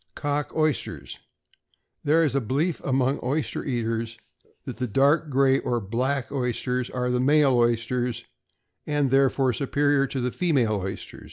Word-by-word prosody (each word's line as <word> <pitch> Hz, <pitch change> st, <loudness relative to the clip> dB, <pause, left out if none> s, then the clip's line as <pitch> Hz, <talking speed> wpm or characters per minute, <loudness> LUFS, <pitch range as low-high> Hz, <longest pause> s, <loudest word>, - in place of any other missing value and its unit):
=Cock 145 Hz, 0 st, -2 dB
Oysters.= 155 Hz, -3 st, -2 dB, 0.8 s
There 160 Hz, +3 st, +3 dB
is 145 Hz, -5 st, +1 dB
a 140 Hz, -, +1 dB
belief 140 Hz, +9 st, -1 dB
among 135 Hz, +1 st, +1 dB
oyster 135 Hz, +2 st, -2 dB
eaters, 115 Hz, -3 st, -2 dB, 0.5 s
that -, -, -6 dB
the 125 Hz, +1 st, -2 dB
dark 145 Hz, +7 st, +2 dB
gray 135 Hz, 0 st, +3 dB
or 120 Hz, -1 st, -1 dB
black 125 Hz, +7 st, -2 dB
oysters 125 Hz, -1 st, -2 dB
are 125 Hz, -1 st, -2 dB
male 135 Hz, +3 st, +3 dB
oysters, 120 Hz, 0 st, 0 dB, 0.6 s
and 145 Hz, -2 st, +1 dB
are -, -, -8 dB
therefore 135 Hz, -1 st, +3 dB
superior 140 Hz, +1 st, +1 dB
to 135 Hz, -, -4 dB
the 125 Hz, 0 st, -1 dB
female 125 Hz, -, +1 dB
oyster. 95 Hz, +1 st, -6 dB
130 Hz, 145 wpm, -25 LUFS, 120-145 Hz, 0.8 s, There